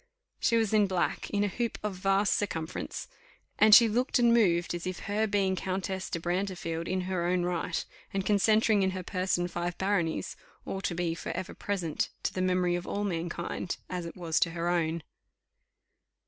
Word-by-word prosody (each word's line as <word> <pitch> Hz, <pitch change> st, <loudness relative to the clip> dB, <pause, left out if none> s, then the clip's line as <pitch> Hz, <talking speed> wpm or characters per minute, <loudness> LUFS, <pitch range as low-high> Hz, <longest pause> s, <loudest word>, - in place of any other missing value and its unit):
She 230 Hz, -, +3 dB
was 220 Hz, -2 st, +1 dB
in 210 Hz, -2 st, +5 dB
black, 185 Hz, -2 st, -1 dB
in 205 Hz, 0 st, +1 dB
a -, -, +2 dB
hoop 235 Hz, +3 st, -2 dB
of 210 Hz, -2 st, -1 dB
vast 195 Hz, +2 st, +2 dB
circumference, 165 Hz, -5 st, -3 dB, 0.5 s
and 215 Hz, 0 st, +9 dB
she 235 Hz, -, +8 dB
looked 245 Hz, +6 st, +1 dB
and 240 Hz, -1 st, +5 dB
moved 175 Hz, -8 st, +3 dB
as 175 Hz, +1 st, -4 dB
if 185 Hz, 0 st, -4 dB
her 215 Hz, +1 st, 0 dB
being 195 Hz, -2 st, +1 dB
Countess 190 Hz, 0 st, -3 dB
de 170 Hz, -, -2 dB
Brantefield 175 Hz, -2 st, -2 dB
in 185 Hz, 0 st, 0 dB
her 180 Hz, -1 st, -2 dB
own 180 Hz, 0 st, +1 dB
right, 175 Hz, -1 st, -1 dB, 0.3 s
and 195 Hz, -1 st, -2 dB
concentring 215 Hz, +1 st, +4 dB
in 190 Hz, -, +3 dB
her 185 Hz, -, -4 dB
person 185 Hz, -1 st, 0 dB
five 175 Hz, 0 st, -3 dB
baronies, 190 Hz, -5 st, 0 dB, 0.3 s
ought 195 Hz, 0 st, -4 dB
to 175 Hz, -, -1 dB
be 170 Hz, -1 st, 0 dB
for 170 Hz, -, -6 dB
ever 185 Hz, +1 st, -5 dB
present 180 Hz, -6 st, -2 dB
to -, -, -1 dB
the 185 Hz, -, -2 dB
memory 180 Hz, -1 st, +2 dB
of 175 Hz, -, -4 dB
all 205 Hz, -, -2 dB
mankind, 170 Hz, -1 st, -3 dB
as 180 Hz, -2 st, -3 dB
it 165 Hz, -, -9 dB
was 165 Hz, -3 st, 0 dB
to 170 Hz, -, +3 dB
her 170 Hz, +1 st, 0 dB
own. 165 Hz, -2 st, 0 dB
185 Hz, 190 wpm, -29 LUFS, 175-205 Hz, 0.5 s, and